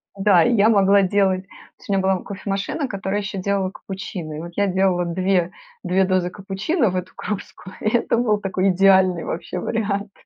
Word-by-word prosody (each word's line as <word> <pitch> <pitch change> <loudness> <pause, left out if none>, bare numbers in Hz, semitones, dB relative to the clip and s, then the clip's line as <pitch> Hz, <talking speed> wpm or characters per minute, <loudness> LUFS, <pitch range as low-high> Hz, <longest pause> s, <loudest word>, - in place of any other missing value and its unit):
Да. 195 -3 +4
И 240 - +2
я 215 -1 +4
могла 200 -2 +5
делать 190 -1 +1
то - - -18 0.2
есть - - -17
у - - +1
меня 195 - +2
была 190 0 +2
кофе-машина, 200 - -4
которая 200 -2 -3
еще 200 -1 -5
делала 195 0 -1
капучино. 185 -5 -7
И 150 - -6
вот 170 +2 -7
я 200 0 +1
делала 190 -1 +1
две 180 0 0 0.3
две 190 +1 +2
дозы 185 -1 +1
капучино 200 - -1
в - - -5
эту 185 0 -4
кружку, 195 -2 -6
и 215 - +1
это 230 - 0
был 215 -3 +1
такой 195 -1 0
идеальный 190 -2 +4
вообще 165 - -5
вариант. 205 -2 -2
195 Hz, 195 wpm, -21 LUFS, 185-200 Hz, 0.3 s, могла